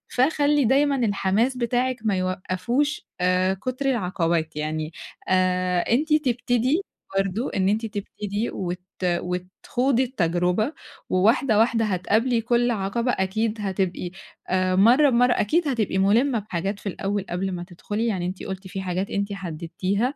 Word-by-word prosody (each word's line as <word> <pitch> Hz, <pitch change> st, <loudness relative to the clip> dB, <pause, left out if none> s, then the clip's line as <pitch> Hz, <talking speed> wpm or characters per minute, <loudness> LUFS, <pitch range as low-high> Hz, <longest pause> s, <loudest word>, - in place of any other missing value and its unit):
فخلّي 290 Hz, +1 st, +3 dB
دايمًا 280 Hz, +4 st, +3 dB
الحماس 220 Hz, +1 st, +1 dB
بتاعِك 250 Hz, +1 st, 0 dB
ما 205 Hz, -3 st, +2 dB
يوقّفوش 185 Hz, +10 st, -1 dB
آآ 185 Hz, +1 st, +2 dB
كتر 255 Hz, +7 st, -4 dB
العقبات 170 Hz, -, 0 dB
يعني 155 Hz, +1 st, -3 dB, 0.3 s
آآ 185 Hz, -1 st, +2 dB
أنتِ 290 Hz, -, +1 dB
تبتدي 255 Hz, -, +1 dB, 0.4 s
برضه 195 Hz, +6 st, -1 dB
إن 190 Hz, -1 st, +2 dB
أنتِ 220 Hz, +3 st, 0 dB
تبتدي 205 Hz, +1 st, -4 dB
وت 180 Hz, -1 st, -4 dB, 0.2 s
وتخوضي 180 Hz, +9 st, 0 dB
التجربة 180 Hz, -, 0 dB, 0.4 s
وواحدة 220 Hz, +5 st, +3 dB
واحدة 225 Hz, 0 st, +3 dB
هتقابلي 220 Hz, +5 st, +1 dB
كل 240 Hz, +1 st, +2 dB
عقبة 230 Hz, +4 st, 0 dB
أكيد 215 Hz, +3 st, -1 dB
هتبقي 190 Hz, -3 st, -2 dB, 0.4 s
آآ 185 Hz, 0 st, +2 dB
مرّة 245 Hz, +10 st, +6 dB
بمرّة 245 Hz, 0 st, +4 dB
أكيد 315 Hz, +11 st, +1 dB
هتبقي 225 Hz, -8 st, 0 dB
مُلِمة 225 Hz, +6 st, +3 dB
بحاجات 195 Hz, 0 st, -3 dB
في 200 Hz, -, -4 dB
الأول 195 Hz, +1 st, -2 dB
قبل 185 Hz, +2 st, -2 dB
ما 175 Hz, -1 st, -4 dB
تدخلي 205 Hz, +5 st, -3 dB
يعني 190 Hz, -6 st, -1 dB
أنتِ 185 Hz, +1 st, -5 dB
قُلتِ 190 Hz, 0 st, -6 dB
في 190 Hz, +1 st, -5 dB
حاجات 185 Hz, +1 st, -2 dB
أنتِ 200 Hz, 0 st, -2 dB
حددتيها 185 Hz, -, -2 dB
200 Hz, 135 wpm, -24 LUFS, 185-245 Hz, 0.4 s, مرّة